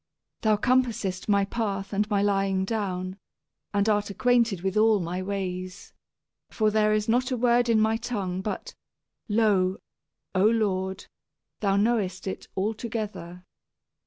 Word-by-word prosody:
Thou 215 -1 +3
searchest 230 -6 0
out - - -11
my 200 -1 +4
path 200 -2 -3
and 210 +2 0
my 200 -2 +2
lying 195 -1 +1
down, 190 -3 -3 0.5
and 200 0 +1
art 205 -1 +2
ac 200 - -7
quainted 235 -7 +2
with 190 +1 -2
all 215 -1 +4
my 175 +1 -3
ways. 185 -1 -5 0.6
For 215 -1 +1
there 215 0 +3
is 215 0 +1
not 250 +3 +2
a 255 - -1
word 240 0 +3
in 225 -1 +4
my 220 +1 +2
tongue, 200 -6 -3
but, 220 - -5 0.6
lo, 205 -4 +2 0.6
O 185 0 +2
Lord, 190 -4 0 0.5
thou 195 -2 +1
knowest 200 -3 0
it 190 - -5
altogether. 210 -4 -4
205 Hz, 145 wpm, -26 LUFS, 190-225 Hz, 0.6 s, my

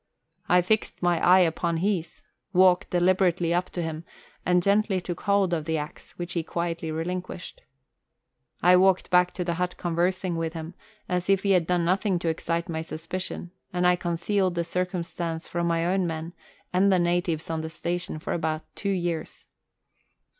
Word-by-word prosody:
I 180 0 +5
fixed 215 0 0
my 175 -1 +2
eye 185 +1 +7
upon 170 0 +1
his, 175 -2 -2 0.3
walked 180 -1 +5
deliberately 180 -1 +2
up 180 +1 0
to 175 - -3
him, 160 0 -4 0.4
and 180 0 +3
gently 200 0 +2
took 175 -1 -6
hold 200 -3 +2
of 160 -3 -1
the 160 0 0
axe, 150 0 -7
which 175 0 -6
he 170 - 0
quietly 170 0 -3
relinquished. 180 - -5 1.0
I 180 +1 +7
walked 190 0 +3
back 180 0 +5
to 180 - -2
the 170 -1 -1
hut 180 +1 -2
con 175 -1 -3
versing 180 0 0
with 165 -1 -2
him, 165 +1 -6 0.3
as 180 +1 -1
if 195 -1 +3
he 200 - +2
had 180 -4 +3
done 175 -1 +1
nothing 190 +1 +2
to 170 -1 -1
excite 165 +1 -2
my 160 -1 -3
suspicion, 170 +2 -5 0.2
and 180 0 0
I 180 0 +5
concealed 175 +2 0
the 170 - 0
circumstance 170 -2 -3
from 170 0 -1
my 165 0 +1
own 185 0 +1
men 165 +1 -4 0.4
and 195 +2 +4
the 185 - +5
natives 175 -2 0
on 160 -1 -1
the 160 - -5
station 175 +1 -3
for 155 - -4
about 160 -1 -1
two 200 - -3
years. 175 -4 -2
175 Hz, 180 wpm, -26 LUFS, 165-185 Hz, 1.0 s, eye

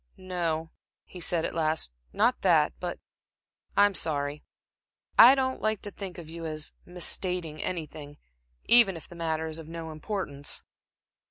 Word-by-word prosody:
"No," 165 -3 -2 0.3
he 180 - -11
said, 170 -1 +1
at - - -2
last 155 - 0 0.2
"not - - +2
that; - - +4
but - - -4 0.8
I'm 205 0 +6
sorry. 145 -4 -1 0.7
I 255 +3 +10
don't 260 -1 -1
like 215 -1 0
to 205 - -4
think 195 -3 -7
of 170 -3 -8
you 165 +1 -8
as 155 -1 -3 0.2
misstating 180 -2 -1
anything, 155 -4 -5 0.5
even 230 -7 +6
if 165 - -10
the - - -12
matter 160 -1 -1
is 160 0 -5
of 160 - -9
no 165 -1 -6
importance." 155 -4 -5
165 Hz, 150 wpm, -28 LUFS, 155-185 Hz, 0.8 s, I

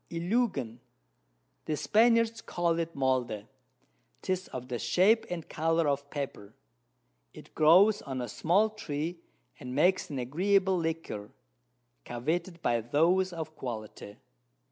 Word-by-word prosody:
Iluigan, 170 - -1 0.9
the 155 - -2
Spaniards 230 +2 +3
call 170 -1 -1
it 165 0 -3
Molde, 130 -6 0 0.8
'tis 185 0 -2
of 125 0 -7
the 125 -2 -4
Shape 185 - +3
and 170 -3 -5
Colour 165 0 +1
of 140 0 -1
Pepper: 135 -8 -6 0.8
It - - -13
grows 185 +7 +5
on 135 -2 -5
a 120 - -3
small 190 - +2
Tree, 165 -4 -4 0.4
and 125 -3 -7
makes 180 +6 +2
an 145 - -5
agreeable 190 +9 +2
Liquor, 160 -11 -4 0.7
coveted 165 +8 -3
by 120 -1 +1
those 170 +10 +2
of 160 -2 -6
Quality. 110 -5 -7
160 Hz, 120 wpm, -29 LUFS, 130-185 Hz, 0.9 s, grows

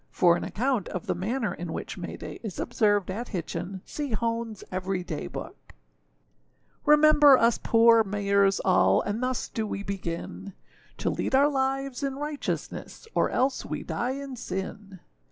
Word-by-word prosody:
For 175 -1 +4
an - - -3
account 245 -1 -1
of 185 - -5
the - - 0
manner 220 +5 -2
in 175 -1 -6
which - - -5
May - - -6
day - - -8
is 210 -6 -6
observed 205 -5 +1
at 235 +6 -4
Hitchin, 180 +1 -5
see 290 -5 -4
Honeâs 230 -1 -2
Every 185 0 -2
Day 160 -4 -5
Book.] - - -9 1.1
REMEMBER 295 -2 +7
us 230 -1 +3
poor 230 0 +6
Mayers 200 -1 +2
all! 185 - +4
And 210 +3 -2
thus 255 0 -1
do 220 -1 -3
we 200 - -4
begin 165 - -5 0.4
To - - 0
lead - - -1
our 280 +2 +5
lives 270 -1 -1
in 275 -1 -2
righteousness, 295 +8 -5
Or - - +2
else 260 +1 0
we - - -5
die 250 +2 -2
in 275 -1 -6
sin. 195 -2 -6
220 Hz, 160 wpm, -27 LUFS, 190-265 Hz, 1.1 s, REMEMBER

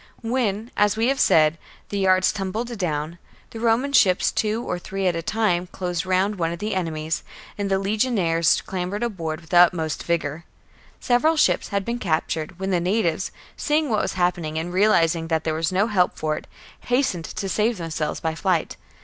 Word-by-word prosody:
I - - -28
5. 225 - -3
When, 230 -3 -1
as 210 0 +2
we 230 +3 +2
have 270 0 0
said, 155 0 +4 0.3
the 200 - -2
yards 185 -1 +4
tumbled 220 +5 -4
down, 160 -1 -2 0.3
the 225 - -7
Roman 235 +5 +1
ships, 185 -8 +4
two 220 +2 -1
or 180 - -3
three 195 +2 -4
at 180 -2 +2
a 165 - -2
time, 180 -2 0
closed 180 -1 -4
round 190 +3 +1
one 165 -2 0
of 170 - -4
the 210 +4 -3
enemy's; 160 -3 -2 0.3
and 200 -1 -3
the 195 - +2
legion 215 +5 0
aries 165 -3 +2
clambered 190 +3 -3
aboard 165 -8 -3
with 160 - -17
the 175 - +4
utmost 165 -3 +3
vigour. 165 -2 -2 0.6
Several 295 +6 +2
ships - - +3
had 200 -2 -2
been 235 +1 -2
captured, 160 -2 -2
when 190 +1 -3
the 180 - +2
natives, 180 -1 0 0.2
seeing 300 -3 0
what 215 - +2
was - - -2
happening 175 -4 -1
and 170 +2 -3
realizing 170 -5 +3
that 160 -1 0
there 160 - -1
was 160 +2 -1
no 190 +3 +2
help 190 -5 +1
for 155 -1 -1
it, - - -8 0.4
hastened 245 -10 0
to 195 - -5
save 215 +4 +1
them 165 -2 -5
selves 155 -1 -2
by 160 -1 -2
flight. 170 0 -1
185 Hz, 200 wpm, -23 LUFS, 165-215 Hz, 0.6 s, said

